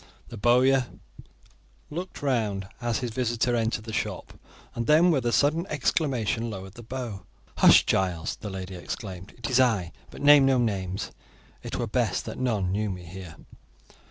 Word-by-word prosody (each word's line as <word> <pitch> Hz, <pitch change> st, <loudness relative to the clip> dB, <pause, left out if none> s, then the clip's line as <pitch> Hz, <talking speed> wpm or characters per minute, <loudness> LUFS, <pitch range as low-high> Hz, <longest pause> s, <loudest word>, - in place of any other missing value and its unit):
The -, -, -8 dB
bowyer 125 Hz, +4 st, +4 dB, 1.0 s
looked 175 Hz, 0 st, -6 dB
round 105 Hz, -8 st, 0 dB
as 120 Hz, -2 st, 0 dB
his 125 Hz, -2 st, -3 dB
visitor 120 Hz, 0 st, 0 dB
entered 115 Hz, -1 st, -1 dB
the 110 Hz, -1 st, -7 dB
shop, -, -, -3 dB, 0.4 s
and 115 Hz, -, -3 dB
then, 160 Hz, +4 st, +6 dB
with 130 Hz, -6 st, +1 dB
a -, -, +2 dB
sudden 155 Hz, +8 st, +2 dB
exclamation, 130 Hz, -6 st, 0 dB
lowered 95 Hz, -2 st, -7 dB
the 120 Hz, -, -11 dB
bow. 115 Hz, -5 st, -6 dB, 0.3 s
"Hush, -, -, +7 dB
Giles!" 90 Hz, -4 st, 0 dB
the 105 Hz, -, -7 dB
lady 95 Hz, -1 st, -6 dB
exclaimed; 95 Hz, +1 st, -7 dB
"it 120 Hz, -, -4 dB
is 130 Hz, -1 st, +2 dB
I, 110 Hz, -9 st, +2 dB, 0.2 s
but -, -, -10 dB
name 145 Hz, -1 st, +8 dB
no 135 Hz, -1 st, +4 dB
names; 100 Hz, -5 st, -2 dB, 0.5 s
it -, -, -5 dB
were -, -, -1 dB
best -, -, -1 dB
that -, -, -6 dB
none 105 Hz, -8 st, 0 dB
knew 105 Hz, +2 st, -1 dB
me 90 Hz, -2 st, -6 dB
here." 90 Hz, -1 st, -9 dB
115 Hz, 165 wpm, -26 LUFS, 95-130 Hz, 1.0 s, name